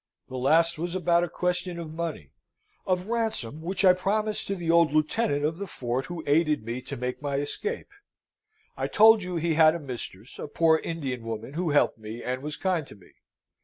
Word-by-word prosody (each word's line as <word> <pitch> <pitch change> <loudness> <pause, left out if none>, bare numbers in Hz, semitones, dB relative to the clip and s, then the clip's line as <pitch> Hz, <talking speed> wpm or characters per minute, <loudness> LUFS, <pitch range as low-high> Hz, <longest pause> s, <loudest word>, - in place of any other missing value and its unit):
"The 130 - -7
last 160 +6 +3
was 175 +2 -3
about 175 -2 +3
a 175 - -2
question 180 +1 -2
of 160 -2 -6
money 160 - -5 0.6
of 180 -1 +1
ransom 220 - -2
which 185 +3 -1
I 185 - +8
promised 210 +3 -1
to 195 - -1
the 170 -3 -1
old 170 -3 +5
lieutenant 155 0 +1
of 160 +3 -2
the 200 - -4
fort 125 -4 -3
who 175 -2 -6
aided 150 -4 +2
me 120 +2 -4
to 135 +2 -7
make 125 +3 -4
my 140 -1 -2
escape. 410 - -3 0.8
I - - -2
told 220 0 +6
you 180 -1 -4
he 165 0 0
had 155 0 +6
a - - -3
mistress, 125 - -8
a - - -5
poor 160 +2 +3
Indian 135 -9 -4
woman, 115 +3 -5
who 170 +1 -1
helped 145 -5 +2
me, 110 +2 -7
and 125 +1 -3
was 150 +1 -4
kind 180 -6 -1
to - - -12
me. 100 - -20
160 Hz, 200 wpm, -27 LUFS, 135-180 Hz, 0.8 s, I